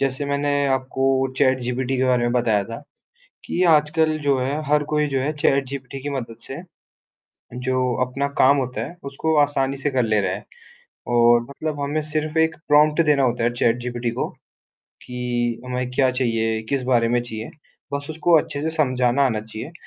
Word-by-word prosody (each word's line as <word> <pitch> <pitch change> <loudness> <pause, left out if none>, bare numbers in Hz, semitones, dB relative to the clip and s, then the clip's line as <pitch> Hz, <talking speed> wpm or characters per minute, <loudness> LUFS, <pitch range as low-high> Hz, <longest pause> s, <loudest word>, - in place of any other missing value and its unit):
जैसे 135 +1 -1
मैंने 140 0 0
आपको 130 0 0 0.3
चैटजीपीटी 130 0 +1
के 130 - +1
बारे 125 -2 +2
में 120 - 0
बताया 110 -5 +2
था, 115 +6 -8 0.6
कि 180 - -1
आजकल 155 +1 +2
जो 140 -2 +1
है 140 +4 -1
हर 150 +1 +3
कोई 150 0 +2
जो 135 -2 -1
है 145 +4 -1
चैटजीपीटी 140 -2 -1
की 145 - -3
मदद 120 -5 -5
से, 135 +6 -7 0.9
जो 130 0 -1
अपना 135 +3 -2
काम 140 +2 +6
होता 125 -2 -2
है 175 - -10
उसको 160 +3 -1
आसानी 140 -1 0
से 140 +2 -1
कर 130 -2 +1
ले 110 -2 +2
रहा - - -1
है। - - -6 0.6
और 120 0 +5
मतलब 150 +1 -4
हमें 145 +2 -1
सिर्फ 155 0 -2
एक 160 0 +2
प्रॉम्प्ट 150 +2 +5
देना 145 -2 +3
होता 120 -2 0
है 120 +1 +1
चैटजीपीटी 120 0 -1
को, - - -3 0.8
कि 120 -1 -2
हमें 125 0 -3
क्या 130 +1 +3
चाहिए, 115 -3 0
किस 140 -2 0
बारे 120 -2 +2
में 120 0 +2
चाहिए। 110 -2 -7 0.4
बस 140 0 -3
उसको 160 +2 +1
अच्छे 145 -2 -2
से 160 - -1
समझाना 130 -2 +2
आना 115 -5 0
चाहिए 110 +6 -8
130 Hz, 180 wpm, -22 LUFS, 120-145 Hz, 0.9 s, काम